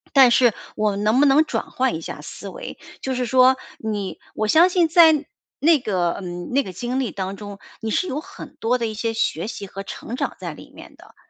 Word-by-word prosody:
但 265 -3 +8
是 240 -2 +4 0.2
我 215 -1 +1
们 200 +1 -3
能 220 +4 +3
不 290 - +6
能 290 +3 +5
转 - - -4
换 260 -5 0
一 160 - -5
下 - - -7
思 - - -8
维， - - -8 0.2
就 265 -1 -2
是 250 0 -1
说 255 +2 +5 0.2
你， 210 -3 -4 0.2
我 215 - -1
相 330 +10 +6
信 355 -2 +3
在 320 -3 +6 0.3
那 315 -1 +5
个， 180 -7 -1
嗯， 175 -1 -6
那 275 +3 +3
个 190 - -7
经 245 +7 -3
历 255 - -1
当 195 0 -4
中， 205 -1 -9 0.2
你 225 - -3
是 370 - +1
有 290 -3 -2
很 - - -11
多 240 +3 +1
的 235 - -2
一 220 - -4
些 225 +1 -2
学 205 -4 -1
习 205 - -6
和 195 +1 -7
成 230 - -7
长 - - -3
在 - - -5
里 - - -14
面 - - -13
的， - - -18
235 Hz, 250 characters per minute, -22 LUFS, 205-270 Hz, 0.3 s, 但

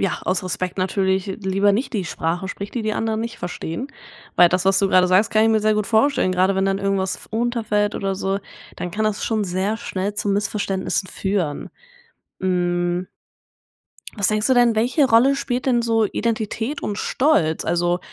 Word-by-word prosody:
ja, 195 -3 -1
aus 185 0 -1
Respekt 185 +1 -3
natürlich 190 +1 0
lieber 195 +1 +1
nicht 240 +7 -1
die 205 -6 -1
Sprache 170 +3 -2
spricht, 200 +3 -7
die 235 - -1
die 215 - -1
anderen 220 0 -1
nicht 230 +1 -4
verstehen. 175 - -5 0.5
Weil 175 -1 +7
das, 185 +1 0
was 195 0 +4
du 195 - +2
grade 185 -1 +4
sagst, 190 +4 +3
kann 215 - +4
ich 225 - +4
mir 220 - +3
sehr 215 0 +2
gut 210 -1 -1
vorstellen, 225 -2 +2
gerade 185 +1 +2
wenn 190 0 +1
dann 195 0 0
irgendwas 195 -1 -1
f - - -15
runterfällt 220 -3 0
oder 195 -1 -2
so, 195 +1 -1 0.4
dann 180 - -5
kann 215 - -2
das 215 -1 -1
schon 220 -2 0
sehr 190 +3 -1
schnell 200 -1 -4
zu 205 - -2
Missverständnissen 200 -2 -1
führen. 190 -7 -2 0.7
Hm 175 -1 0 1.1
was 200 -3 +1
denkst 215 0 +1
du 260 - +3
denn, 240 -2 +4
welche 250 +7 +2
Rolle 260 +4 +4
spielt 250 -1 -3
denn 240 -3 +2
so 225 -1 +2
Identität 230 +5 -2
und 205 - -3
Stolz? 205 - +1
Also, 175 +1 +1
200 Hz, 190 wpm, -21 LUFS, 185-220 Hz, 1.1 s, Weil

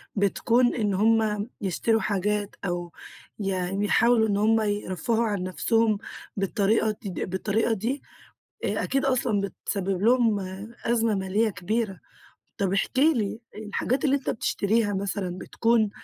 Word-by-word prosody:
بتكون 235 +5 +2
إن 210 -4 0
هُم 215 +1 +2
يشتروا 220 +4 +1
حاجات، 205 +1 -1
أو 175 -1 -3 0.5
يعني 195 0 -1
يحاولوا 225 +1 +4
إن 200 -1 +1
هُم 220 +1 +3
يرفهوا 205 +2 0
عن 205 -4 -1
نفسهم، 220 +3 +1 0.4
بالطريقة 210 +2 +1
دي 195 -6 -4
بالطريقة 210 +5 0
دي، 240 +7 -2 0.6
آآ - - 0
أكيد 275 +1 0
أصلًا 245 -6 +1
بتسبب 195 0 -3
لهم 230 -3 +4 0.4
أزمة 230 -2 +2
مالية 200 +3 +1
كبيرة. 200 +1 -2 0.6
طب 195 -2 0
احكِ 200 +6 0
لي 235 -8 +2 0.2
الحاجات 220 +6 -2
اللي 280 0 +4
أنت 275 - -2
بتشتريها 210 -1 0
مثلًا، 190 -2 -3
بتكون 225 -1 +1
210 Hz, 125 wpm, -26 LUFS, 195-230 Hz, 0.6 s, يحاولوا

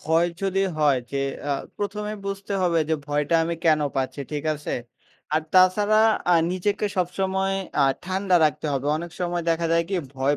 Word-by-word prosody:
ভয় 165 +2 +2
যদি 195 0 +1 0.2
হয় 145 -3 +4
যে 140 - 0 0.3
আ - - +3 0.3
১ম 205 +1 -3
এই 215 - -7
বুঝতে 195 0 -4
হবে 170 -2 +2
যে 160 - +2
ভয়টা 150 +2 0
আমি 170 +1 -2
কেন 155 -2 +4 0.2
পাচ্ছি, 135 +2 -2
ঠিক 150 0 -3
আছে? 150 0 -4 0.6
আর 155 - +2
তাছাড়া 205 +4 +5 0.3
আ - - +6 0.2
নিজেকে 205 +3 0
সবসময় 190 +2 0 0.3
আ - - +5 0.2
ঠান্ডা 185 0 +1
রাখতে 155 0 0
হবে 140 0 -2
অনেক 170 +2 -6
সময় 175 -1 -1
দেখা 165 0 +1
যায় 170 0 +3
কি 195 - -1 0.2
ভয় 140 +2 +1
175 Hz, 180 wpm, -24 LUFS, 150-195 Hz, 0.6 s, আ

